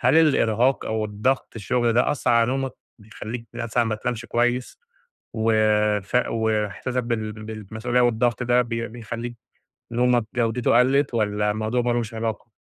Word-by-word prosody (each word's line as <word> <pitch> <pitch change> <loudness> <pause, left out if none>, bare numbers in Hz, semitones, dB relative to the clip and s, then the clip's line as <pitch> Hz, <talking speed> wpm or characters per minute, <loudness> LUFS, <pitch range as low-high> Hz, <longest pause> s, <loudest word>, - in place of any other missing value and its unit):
هل 130 +5 +4
الإرهاق 130 -5 +3
أو 110 -1 -1
الضغط 105 +6 -1
الشغل 120 +2 +1
ده 120 - +3
أثَّرعلى 115 -4 +2
نومك؟ 135 -1 -1 0.3
بيخليك 110 +2 -8
مثلًا 120 0 0
ما 115 - -1
تنامش 115 +2 -4
كويس؟ 120 - 0 0.6
و 110 0 +1 0.5
ف 100 - -2
وإحساسك 110 +2 -1
بال 110 -2 -2
بالمسئولية 110 +3 -3
والضغط 120 0 +2
ده 125 +1 +3
بي 115 -1 -3
بيخليك 115 +1 -6 0.6
نومك 120 0 +2
جودته 120 0 +2
قلَّت، 135 +2 +2
والّا 105 -2 +1
الموضوع 110 +3 -1
ما 120 0 0
لوش 120 -1 -2
علاقة؟ 115 +1 -4
115 Hz, 140 wpm, -23 LUFS, 110-125 Hz, 0.6 s, هل